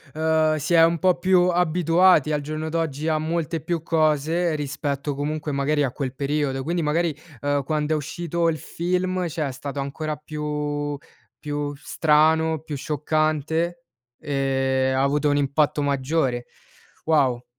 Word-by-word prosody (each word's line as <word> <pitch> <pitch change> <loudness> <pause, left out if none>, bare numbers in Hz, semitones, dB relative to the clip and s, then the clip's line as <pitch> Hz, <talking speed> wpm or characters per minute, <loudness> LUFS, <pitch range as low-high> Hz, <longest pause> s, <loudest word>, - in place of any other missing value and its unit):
uhm, 160 0 +2
si 155 +3 -2
è 165 -1 +7
un 165 0 +3
po' 185 0 +3
più 180 0 +3
abituati 175 -2 +3
al 150 - 0
giorno 155 +2 -4
d'oggi 160 -2 -2
a 155 -1 +2
molte 160 0 -2
più 170 0 -2
cose, 160 +1 +1
rispetto 145 -1 -3
comunque 150 +1 -3
magari 145 +2 +1
a 135 - 0
quel 130 -1 -4
periodo, 140 0 -1
quindi 170 +4 -1
magari, 160 +1 0 0.3
uhm, 145 0 0
quando 150 +2 -1
è - - +2
uscito 170 +2 -1
il 160 - -1
film, 180 +4 -1
cioè, 155 -1 -2
è - - -4
stato 140 +2 -6
ancora 145 +3 -3
più 150 -1 -3 0.4
più 145 -1 -3
strano, 160 +2 +2
più 150 0 -6
scioccante 155 +3 -1 0.4
e 135 -2 0
ha 130 - +2
avuto 145 +2 +2
un 145 - +2
impatto 145 +1 +1
maggiore, 135 -3 0 0.6
wow! 135 -6 +2
150 Hz, 150 wpm, -23 LUFS, 145-160 Hz, 0.6 s, è